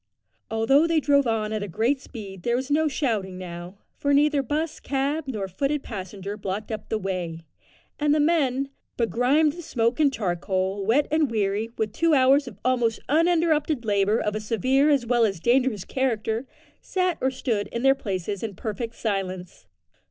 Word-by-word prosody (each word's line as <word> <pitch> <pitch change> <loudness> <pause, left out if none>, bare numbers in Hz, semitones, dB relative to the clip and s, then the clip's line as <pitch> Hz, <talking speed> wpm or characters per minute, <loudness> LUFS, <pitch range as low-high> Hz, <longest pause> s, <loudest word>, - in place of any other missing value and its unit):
Although 270 +8 +3
they 330 -1 +3
drove 280 -2 +3
on 220 -1 0
at 205 -3 -3
great 235 - +1
speed 200 -8 -9
there 235 +6 0
was 260 +3 -3
no 310 +2 +3
shouting 220 -10 -1
now, 175 +1 -8 0.2
for 285 0 +2
neither 295 0 +3
'bus, 300 +5 -2
cab, 280 +3 -1
nor 210 -7 -3
foot 275 +10 -1
passenger 195 -1 -6
blocked 210 +2 -4
up 215 -1 -6
the 220 - 0
way, 180 -5 -4 0.6
and 295 -1 +2
the 305 - +3
men, 275 -4 +1 0.3
begrimed 250 +6 +2
with 345 +1 -9
smoke 235 -2 0
and 290 -3 +4
charcoal, 190 -1 -1
wet, 245 +9 +2
and 310 -3 +2
weary 210 0 0
with 215 -1 -1
two 330 +2 +3
hours 270 +1 +4
of 215 -6 -9
almost 240 -3 +1
uninterrupted 315 -4 +2
labour 205 +1 +2
of 210 - -1
a - - -1
severe 255 +7 +2
as 280 -5 +3
well 240 0 +3
as 195 -6 +1
dangerous 240 -1 +2
character, 235 -2 -1 0.3
sat 365 -3 -1
or 260 - +2
stood 235 -5 -2
in 235 - -4
their 270 0 +6
places 200 -6 -4
in 220 -4 -4
perfect 225 +3 -4
silence. 185 -4 -4
235 Hz, 175 wpm, -25 LUFS, 205-280 Hz, 0.6 s, their